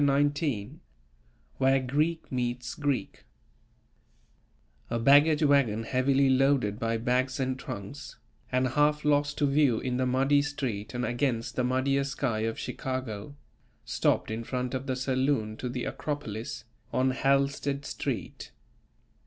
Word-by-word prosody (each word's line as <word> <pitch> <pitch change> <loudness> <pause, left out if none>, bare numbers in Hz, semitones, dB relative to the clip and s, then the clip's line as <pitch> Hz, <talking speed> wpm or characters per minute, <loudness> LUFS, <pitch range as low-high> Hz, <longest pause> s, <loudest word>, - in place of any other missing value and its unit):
XIX 140 -5 +1 0.9
WHERE 135 0 +4
GREEK 150 +6 -1
MEETS 125 -1 -2
GREEK 145 -3 -2 1.7
A 115 - -1
baggage 145 +6 +5
wagon 135 -7 +3
heavily 135 +3 +2
loaded 130 -5 +2
by 115 0 0
bags 125 +3 0
and 130 -1 -1
trunks, 115 +7 -7 0.3
and 130 0 +2
half 150 +3 +2
lost 145 0 +2
to 145 - +2
view 140 -4 +3
in 125 -1 -2
the 130 0 +1
muddy 135 +3 +3
street 125 -7 -4
and 125 0 -1
against 120 0 -1
the 125 - +1
muddier 130 +2 +1
sky 135 -5 -2
of 115 +1 -2
Chicago, 130 -1 -4 0.5
stopped - - +1
in 115 +1 -3
front 125 +1 -3
of 130 +1 -3
the 130 - 0
saloon 130 -4 0
to 125 - -4
the 125 0 -3
Acropolis, 120 -7 -4 0.3
on 130 +1 +2
Halstead 140 +1 +1
Street. - - -4
130 Hz, 130 wpm, -28 LUFS, 120-140 Hz, 1.7 s, baggage